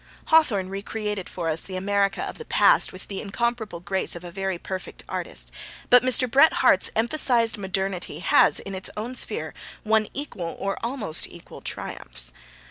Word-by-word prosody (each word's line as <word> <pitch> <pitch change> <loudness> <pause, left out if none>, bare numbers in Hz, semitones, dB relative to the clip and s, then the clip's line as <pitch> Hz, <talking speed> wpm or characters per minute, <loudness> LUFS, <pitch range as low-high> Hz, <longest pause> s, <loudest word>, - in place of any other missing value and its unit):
Hawthorne 235 -13 +4
re 195 +1 -4
created 210 -3 -4
for 170 -2 -4
us 160 0 +2
the 190 - -6
America 200 +1 +1
of - - -6
the 465 - -7
past - - +4
with - - -11
the 195 - -5
incomparable 220 -3 -2
grace 190 0 -1
of 170 - -8
a 175 - -8
very 190 0 -2
perfect 185 +2 -7
artist, - - -4 0.4
but 245 0 +9
Mr. 255 0 +3
Bret 275 +6 +6
Harte's - - +4
emphasised 235 -1 +3
modernity 190 -4 -2
has, 175 - +4
in 195 - -7
its 190 0 -4
own 230 +4 -4
sphere, - - -2 0.3
won 220 0 +2
equal, 195 - -5
or 195 0 -2
almost 230 - -1
equal, 170 - -12
triumphs. - - -3
200 Hz, 170 wpm, -25 LUFS, 190-235 Hz, 0.4 s, but